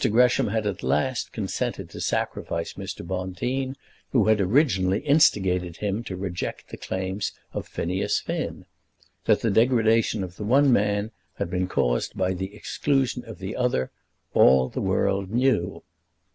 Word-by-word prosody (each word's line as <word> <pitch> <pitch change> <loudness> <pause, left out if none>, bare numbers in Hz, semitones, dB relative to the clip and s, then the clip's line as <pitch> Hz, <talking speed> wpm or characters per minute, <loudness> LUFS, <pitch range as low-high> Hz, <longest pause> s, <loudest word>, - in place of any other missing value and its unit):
Gresham 125 +3 +4
had 110 +1 -1
at 100 -3 -2
last 130 -2 0
consented 100 -4 -3
to - - -7
sacrifice 85 0 -2
Mr. - - -7
Bonteen, 95 +10 -2 0.4
who 120 -7 +3
had 110 -1 +4
originally 100 - +2
instigated 95 - +3
him 105 +2 -2
to 95 - -5
reject 90 -1 -4
the - - -8
claims 95 +2 -3 0.2
of - - -4
Phineas 90 +3 -1
Finn. - - -4 0.6
That - - +3
the 115 - +1
degradation 115 -2 +3
of 90 -1 -8
the - - -5
one 135 +5 +4
man 105 0 +1 0.2
had 85 - -3
been 90 0 0
caused - - 0
by 95 0 +1
the 95 +2 -5
exclusion 130 +1 0
of 115 -4 -9
the 95 +4 -5
other 125 - 0 0.4
all 65 -1 +5
the - - -4
world 100 -1 0
knew. 120 -5 +1
100 Hz, 150 wpm, -25 LUFS, 95-120 Hz, 0.6 s, all